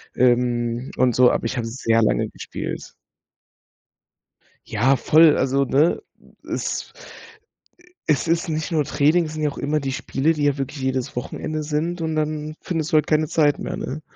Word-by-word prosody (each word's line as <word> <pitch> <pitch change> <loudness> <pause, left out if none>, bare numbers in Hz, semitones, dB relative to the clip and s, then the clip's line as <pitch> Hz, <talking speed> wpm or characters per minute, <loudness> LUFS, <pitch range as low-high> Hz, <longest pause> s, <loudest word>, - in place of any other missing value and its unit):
ähm, 120 0 +1
und 125 -2 +3
so, 125 -1 +6
aber - - -1
ich 120 - -2
habe 115 -1 -2
sehr 115 -1 +1
lange - - +1
gespielt. - - -7 1.7
Ja 125 +5 +2
voll, 155 +5 +5
also 135 +1 +1
ne, 150 - +2 0.5
es - - -3 1.1
es 150 +1 +1
ist 165 +1 0
nicht 155 +2 -2
nur 155 -2 +2
Training, 155 +5 +2
sind 155 0 -6
ja 150 - +2
auch 140 - -10
immer 150 +2 0
die 135 -1 -3
Spiele, 140 +4 0
die 150 -2 -3
ja 145 -1 +2
wirklich 135 +1 -5
jedes 130 -2 -2
Wochenende 155 +5 -4
sind 160 +3 -2
und 160 -1 -2
dann 155 0 -2
findest 165 -2 -3
du 155 - +2
halt 150 - +3
keine 155 0 +2
Zeit 145 -2 +2
mehr, - - -4
ne? 150 +4 -5
145 Hz, 170 wpm, -22 LUFS, 130-155 Hz, 1.7 s, so